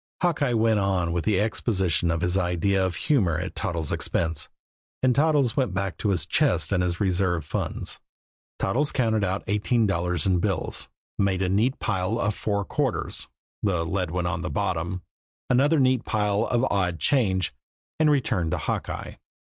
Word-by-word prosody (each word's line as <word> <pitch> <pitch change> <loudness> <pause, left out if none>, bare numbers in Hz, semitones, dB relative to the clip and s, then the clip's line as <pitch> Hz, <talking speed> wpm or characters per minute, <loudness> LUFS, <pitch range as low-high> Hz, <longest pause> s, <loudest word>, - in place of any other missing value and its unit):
Hawkeye 145 -7 +2
went 110 -1 +3
on 95 -4 0
with 85 -1 -2
the 105 -3 +2
exposition 95 - +1
of 85 0 0
his 90 +1 0
idea 95 +1 +1
of 95 -2 -1
humor 95 - +1
at - - -4
Toddles' 80 -3 -2
expense; 80 -3 -1 0.5
and 130 -1 +4
Toddles 145 -4 +2
went 130 -8 0
back 95 -1 -1
to 105 - 0
his 90 -5 0
chest 95 - +2
and 90 -2 +2
his 90 -1 -1
reserve 90 -4 +1
funds. - - -3 0.6
Toddles 135 +10 +1
counted 110 -5 +1
out 95 0 -1
eighteen 110 +2 +1
dollars 90 -4 0
in 95 -2 +3
bills, 95 -4 -1 0.3
made 95 -1 +1
a 90 - 0
neat 110 +8 +2
pile 95 +1 -1
of 105 -2 0
four 100 -1 -2
quarters - - -2 0.3
the 90 -5 0
lead 90 0 -1
one 90 +1 -2
on 85 -1 -1
the 90 - -3
bottom 90 -3 -2 0.5
another 145 +5 +4
neat 130 -2 +3
pile 105 0 0
of 120 -1 +1
the 130 - +1
odd 90 -4 0
change, 95 - +2 0.5
and 155 -1 +4
returned 115 - +1
to - - -1
Hawkeye. - - -4
95 Hz, 170 wpm, -25 LUFS, 90-115 Hz, 0.6 s, and